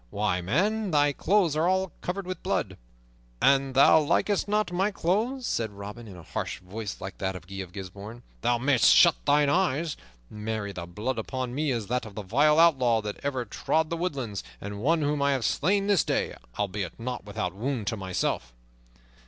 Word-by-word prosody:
Why, 100 - 0
man, 200 - 0
thy 145 -3 +3
clothes 180 -1 +2
are 160 +2 +2
all 190 -1 +1 0.2
over 195 +2 -2
blood!" 185 0 -2 0.6
"An 135 -1 +3
thou 140 +4 +7
likest 195 +7 +1
not 210 -1 +1
my 190 +3 +1
clothes," 220 +8 -1
said 115 - -1
Robin 105 +3 -8
in 95 -3 -10
a 85 - -11
harsh - - -4
voice 100 +3 -7
like 95 +1 -7
that 95 0 -2
of 90 -2 -9
Guy 95 +2 -9
of 95 -3 -6
Gisbourne, 100 +5 -9 0.2
"thou 120 +1 +2
mayst 130 0 +5
shut 170 -3 +7
thine 145 0 +4
eyes. 155 -1 +1 0.3
Marry, 105 - -4
the 85 -3 -7
blood 110 +7 -3
upon 130 +2 -4
me 150 +2 0
is 115 -5 -1
that 125 +1 -2
of 100 - -12
the 105 - -5
vilest 145 +10 +3
outlaw 130 -9 +4
that 105 -1 -5
ever 130 -3 -2
trod 160 +8 0
the - - 0
woodlands, 135 - -3 0.2
and 100 0 -6
one 160 +5 +2
whom 145 0 0
I 140 0 +3
have 130 -5 -1
slain 195 - +1
this 200 -6 +3
day, - - -1 0.2
albeit 100 -2 -3
not 125 +1 -4
without 100 -3 -3
wound 115 +2 -3
to 110 - -1
myself." 90 - -2
130 Hz, 190 wpm, -27 LUFS, 105-160 Hz, 0.6 s, thou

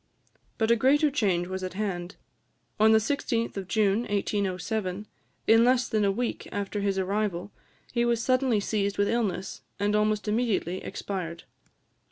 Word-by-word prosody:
But 225 0 +2
a - - +6
greater 285 +5 +3
change 190 -10 +1
was 185 +1 -5
at 185 0 -5
hand; 190 -3 -3 0.6
on 220 +1 +6
the 220 - +7
16th 230 0 -1
of 195 -2 -5
June 205 0 +2
1807, 200 -1 -2 0.4
in 225 +1 +6
less 250 0 +3
than 215 -1 +1
a 200 - +3
week 240 +4 -3
after 205 0 -3
his 200 -1 0
arrival, 195 -1 -1 0.4
he 235 -1 +1
was 235 -1 +2
suddenly 255 -2 +2
seized 200 -1 -1
with 205 - +2
illness, 205 -5 -2 0.2
and 205 +1 +1
almost 210 0 +1
immediately 210 -5 0
expired. 170 -4 -5
210 Hz, 155 wpm, -27 LUFS, 195-230 Hz, 0.6 s, the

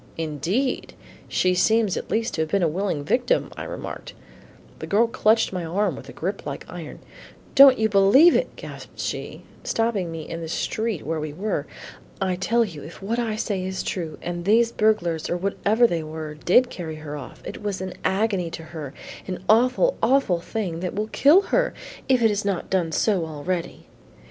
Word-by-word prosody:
"Indeed! 165 - -2 0.3
she 185 0 +2
seems 220 +2 +3
at - - -5
least 225 +1 0
to 160 - -1
have 160 - -1
been 195 +2 +1
a - - +4
willing 170 -2 -2
victim," 245 - +1
I - - -6
remarked. - - -7 0.7
The - - -6
woman 230 +3 +3
clutched 220 -2 +3
my 180 -2 -2
arm 180 +1 0
with 135 0 -10
a - - -7
grip 195 +4 -4
like 140 -1 -6
iron. 170 -4 -8 0.6
"Don't 275 -2 +9
you 220 - +2
believe 215 - +6
it," - - 0
gasped - - -10
she, - - -4 0.2
stopping 220 -7 0
me 160 -1 -6
in 165 - -5
the 165 - -5
street 220 +3 -2
where 160 +1 -2
we 150 -1 -4
were. 180 -4 -2 0.5
"I 190 -1 0
tell 230 +6 +2
you 165 -8 -8
if 165 +6 -11
what 230 +4 -1
I 225 -3 -1
say 200 -3 -2
is 190 0 -3
true, 165 -5 -4
and 175 0 -4
these 230 +4 +4
burglars 175 -8 +1
or 175 - 0
whatever 200 +5 +2
they 170 -8 +1
were, 155 0 -6
did 185 +11 +3
carry 160 -3 -6
her 155 -1 -7
off, 145 -3 -10
it - - -7
was 205 -2 -3
an 185 -1 -5
agony 195 -3 +1
to 165 - -7
her, 155 -4 -8 0.3
an 185 -1 -5
awful, 255 - +4
awful 230 -7 +3
thing 180 -5 -3
that 180 0 -4
will 215 +2 -2
kill 295 - +6
her - - +2 0.3
if 255 -3 +4
it 225 - +6
has 210 0 -1
not 200 -3 -2
done 180 -4 +1
so 190 +1 +1
already. 165 +3 -4
190 Hz, 195 wpm, -24 LUFS, 165-220 Hz, 0.7 s, Don't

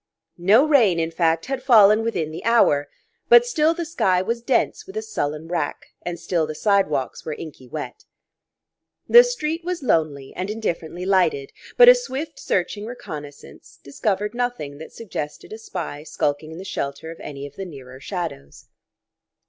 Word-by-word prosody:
No 210 - +5
rain, 225 - +4
in 165 0 -1
fact, 165 -1 +1
had 270 -1 -3
fallen 215 -4 +6
within 175 -9 -2
the 160 - -7
hour; 145 -12 +3 0.4
but 480 0 +8
still 325 -8 +2
the 340 - -3
sky 190 - +1
was 230 +6 -2
dense 260 +8 0
with 385 +3 -8
a - - -1
sullen 155 - -3
rack, 165 -4 -3
and 175 -1 -5
still 165 -4 -1
the 155 - -6
sidewalks 195 -9 0
were 155 - -4
inky 150 -5 -10
wet. 150 +4 -7 1.0
The 480 +1 +9
street 335 -10 -3
was 355 -3 -4
lonely 155 - 0
and 185 +2 -4
indifferently 180 -5 -4
lighted, 175 -8 +1 0.3
but - - +9
a - - +12
swift 320 - -5
searching 205 +3 -2
reconnaissance 150 -11 -10
discovered 205 +8 -2
nothing 240 -13 -3
that 160 - -10
suggested 155 -6 -7
a 220 - -8
spy 170 -9 -6
skulking 150 0 -2
in 160 - -9
the 190 - -8
shelter 145 -2 -4
of 165 - -11
any 140 -1 -7
of 145 0 -11
the 195 - -6
nearer 130 -6 -11
shadows. 160 - -6
180 Hz, 165 wpm, -22 LUFS, 155-240 Hz, 1.0 s, a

